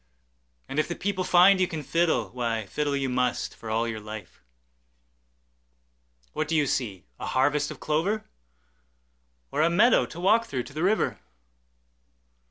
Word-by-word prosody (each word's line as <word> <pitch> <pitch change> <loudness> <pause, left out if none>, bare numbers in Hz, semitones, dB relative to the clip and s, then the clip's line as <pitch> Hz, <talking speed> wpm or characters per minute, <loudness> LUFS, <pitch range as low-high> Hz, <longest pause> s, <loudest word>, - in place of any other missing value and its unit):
And 140 - -2
if 155 - +1
the 175 - -4
people 190 -1 -2
find 180 +2 +6
you 185 - +3
can 155 -3 -5
fiddle, 165 +3 +1
Why, 115 -3 -2
fiddle 145 +7 -2
you 135 -1 -1
must, 125 -1 -1
for 115 - -9
all 115 +2 0
your 110 -1 -4
life. 105 -2 -9 1.9
What 155 - -2
do 165 - -1
you 150 -2 +3
see, 105 -9 -2
a - - -5
harvest 145 +3 +1
of - - -8
clover? 180 +8 -1 1.3
Or - - 0
a 165 - +4
meadow 210 +8 +4
to 165 - -10
walk 220 +6 +3
through 130 -3 -3
to 140 - -13
the 155 - -4
river? 200 +5 +1
150 Hz, 160 wpm, -26 LUFS, 125-175 Hz, 1.9 s, find